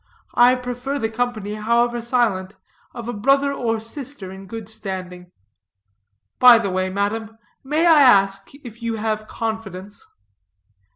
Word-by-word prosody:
I 245 +1 +5
prefer 250 +2 -4
the 225 -4 -2
company, 220 -3 -2
however 235 +2 +1
silent, 220 -5 0 0.4
of 235 -2 -8
a 240 - -3
brother 275 +6 +2
or 230 -4 -1
sister 230 -3 -7
in 190 0 -11
good 225 0 -7
standing. 185 -4 -6 1.1
By 250 -2 +9
the 200 -4 -2
way, 185 0 -1
madam, 215 +3 -3 0.3
may 300 +5 +1
I 320 -3 +7
ask 195 -6 +4 0.2
if 230 0 -11
you 230 -1 -2
have 215 0 -3
confidence?" 205 -3 -5
225 Hz, 135 wpm, -21 LUFS, 200-245 Hz, 1.1 s, By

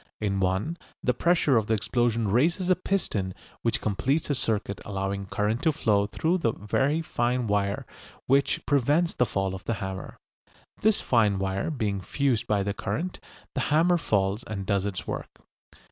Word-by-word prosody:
In 100 -2 0
one 95 - 0 0.3
the 125 - +2
pressure 160 -2 +3
of 110 -2 +1
the 110 - +3
explosion 115 +1 +1
raises 170 - +2
a - - +6
piston 110 - -1 0.3
which - - 0
completes 135 +10 0
a - - +3
circuit 105 -6 -1
allowing 100 0 -3
current 105 +4 0
to 160 - +3
flow 105 -8 +2
through 165 - 0
the 115 -9 +1
very 135 - 0
fine 125 -3 0
wire 100 -1 0 0.4
which 140 +1 +2
prevents 145 +5 +2
the 125 - +1
fall 95 -1 -1
of 95 -1 -8
the 115 - 0
hammer. 95 -2 -6 0.6
This 215 0 +3
fine 110 -5 +3
wire 95 +3 -1
being 105 -9 -1
fused 130 +2 0
by 105 -2 +2
the 100 0 -1
current, 155 - -3 0.3
the - - -1
hammer 170 +4 +4
falls 100 -4 0
and 100 -3 -5
does 100 +1 +1
its 95 -3 -4
work. - - -6
110 Hz, 170 wpm, -27 LUFS, 100-145 Hz, 0.6 s, a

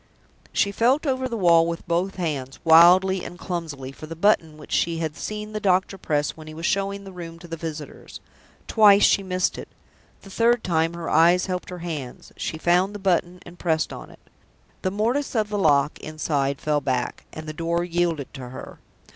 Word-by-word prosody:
She 200 - +1
felt 250 +9 +2
over 260 -2 -1
the 230 - -3
wall 170 -4 +5
with 170 +2 -5
both 175 +3 0
hands, 145 -7 -3
wildly 180 +3 +6
and 175 - -8
clumsily, 160 -8 -5
for 155 +3 -11
the 165 - -7
button 165 -4 +2
which 150 - -13
she 165 -1 +1
had 160 -2 -3
seen 210 0 -5
the 215 - -2
doctor 190 -1 +1
press 150 -5 -1
when 155 -1 -13
he 155 - -9
was 165 +1 -5
showing 200 +1 -1
the 195 - -10
room 170 -2 -8
to 175 +1 -12
the 165 - -5
visitors. 155 -2 -8 0.5
Twice 205 -2 +6
she 200 - +5
missed 185 -1 -1
it. - - -8 0.6
The 195 - -12
third 235 +3 +2
time 165 -1 0
her 170 -1 -6
eyes 170 +3 +4
helped 180 -1 -4
her 180 - -6
hands; 145 -7 -6
she 160 - -4
found 180 +5 +2
the - - -3
button 180 -2 0
and 175 0 -13
pressed 160 -2 0
on - - -9
it. - - -15 0.6
The - - 0
mortise 235 +9 -1
of 215 -2 +1
the 205 -1 -2
lock 145 -4 +2
inside 145 -3 -2
fell 150 -1 0
back, 130 -3 -2
and 155 - -8
the 155 - -5
door 170 +2 -1
yielded 170 -4 -1
to 130 -3 -8
her. 130 - -10
170 Hz, 200 wpm, -24 LUFS, 155-195 Hz, 0.6 s, wildly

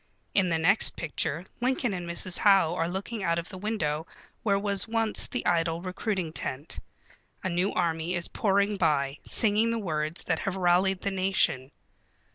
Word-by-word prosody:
In 190 -3 +3
the 165 - +2
next 180 +7 +2
picture 165 +1 -3
Lincoln 250 -3 +1
and 175 -2 -5
Mrs. 175 +1 0
Howe 195 -5 +5
are 165 -1 -1
looking 200 +4 -4
out 170 -3 +1
of 170 - -4
the 190 - -8
window 165 -7 -2 0.3
where 200 -3 +2
was 200 0 +1
once 225 -1 +1
the 245 - -4
idle 165 -1 +1
recruiting 185 -2 -3
tent. 145 -1 -3 0.6
A 190 - 0
new 180 +3 +1
army 170 0 -1
is 175 0 +1
pouring 200 0 +1
by, 145 -5 +1
singing 220 0 +2
the 230 - 0
words 155 -5 -2
that 165 -2 0
have 195 -1 -2
rallied 185 +1 +2
the 200 - -1
nation. 185 -9 +1
185 Hz, 170 wpm, -28 LUFS, 165-200 Hz, 0.6 s, Howe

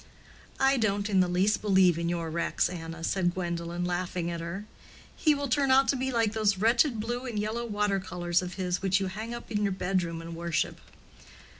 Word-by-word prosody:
"I 270 0 +4
don't 205 -2 0
in 190 - +4
the 180 - +4
least 185 +5 +2
believe 190 -5 +4
in 170 0 -1
your 170 -2 -2
Rex, 170 +1 0
Anna," 165 -2 -7
said 175 0 0
Gwendolen, 170 -1 -3
laughing 175 -1 -2
at 170 -1 -4
her. 170 +5 -5 0.5
"He 305 -2 +3
will 285 0 -2
turn 275 +1 +2
out 265 +1 +5
to - - +3
be 260 0 -1
like 230 -3 +1
those 210 -3 +2
wretched 230 +4 +3
blue 240 +4 -3
and 230 -4 -4
yellow 220 +3 -2
water 205 -2 0
colors 175 -1 -1
of 180 -1 -6
his 180 -2 -2
which 195 0 +2
you 195 - -1
hang 215 +5 -5
up 235 0 -8
in 210 -1 0
your 200 -1 +1
bedroom 180 -3 -1
and 165 0 -7
worship." 170 -1 -2
195 Hz, 205 wpm, -28 LUFS, 175-225 Hz, 0.5 s, out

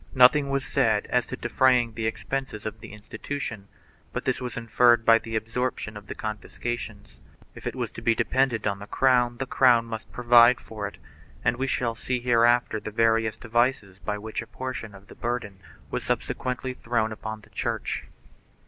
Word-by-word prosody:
Nothing 140 +3 +6
was 140 -1 -1
said 110 -6 +2
as 125 -1 +2
to - - -5
defraying 120 -1 +3
the 110 0 -2
expenses 130 -1 -4
of 110 0 -5
the - - -10
institution, 110 +1 -6 0.5
but - - -4
this - - 0
was 125 -2 -5
inferred 120 0 +4
by 115 0 +7
the 115 -1 -6
absorption 115 0 -2
of 105 0 -10
the - - -6
confiscations. 110 -1 -5 0.3
If - - -8
it - - -3
was - - -3
to - - -9
be 115 - +3
dependent 130 -3 +1
on 100 -1 0
the 100 - -9
crown 125 -2 +3
the 135 - -2
crown 125 -3 +4
must 110 -3 -7
provide 120 +2 +6
for 105 -4 -6
it, 100 - -11 0.5
and - - +3
we 135 +1 -1
shall 120 -3 0
see 125 +2 -2
hereafter 120 -1 +3
the 110 - -6
various 115 0 +2
devices 120 -5 0
by 105 - -3
which 110 +2 -4
a 120 - -10
portion 120 -3 -6
of 100 0 -14
the - - -13
burden 115 -5 -4 0.3
was - - -2
subsequently 130 0 -2
thrown 115 -3 -1
upon 110 0 -6
the - - -20
Church. - - -3
115 Hz, 185 wpm, -26 LUFS, 110-125 Hz, 0.5 s, by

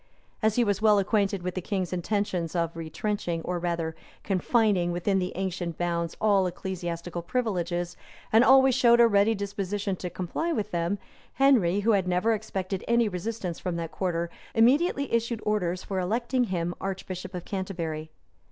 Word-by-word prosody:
As 220 -1 +2
he 245 - +4
was 205 -2 0
well 215 -1 +5
acquainted 200 -1 +1
with 180 0 -2
the 185 - -3
king's 185 -1 -2
intentions 180 -2 -1
of 170 -1 0
retrenching, 165 +1 -3
or 180 -1 -2
rather 170 -2 -2 0.3
confining 195 -2 +2
within 190 +3 +1
the 180 0 -2
ancient 180 -3 -3
bounds, 170 -1 -2
all 200 -3 +3
ecclesiastical 175 -1 -4
privileges, 175 -5 -2 0.4
and 225 +2 +7
always 265 0 +6
showed 240 -2 +5
a 235 - +8
ready 205 +1 +3
disposition 200 0 -3
to 180 - -4
comply 185 - -3
with 215 -9 -2
them, 170 +3 0 0.4
Henry, 215 -9 +4
who 205 -2 +3
never 180 +5 +1
expected 195 -3 -3
any 235 -1 +3
resistance 185 -2 -4
from 180 -2 -3
that 165 -1 -4
quarter, 170 -2 -2 0.2
immediately 275 +4 +3
issued 235 0 0
orders 185 -4 0
for 190 -2 -3
electing 235 +7 0
him 175 -4 -2
archbishop 185 -1 -5
of 175 - -6
Canterbury. 170 -5 -4
190 Hz, 160 wpm, -27 LUFS, 175-215 Hz, 0.4 s, a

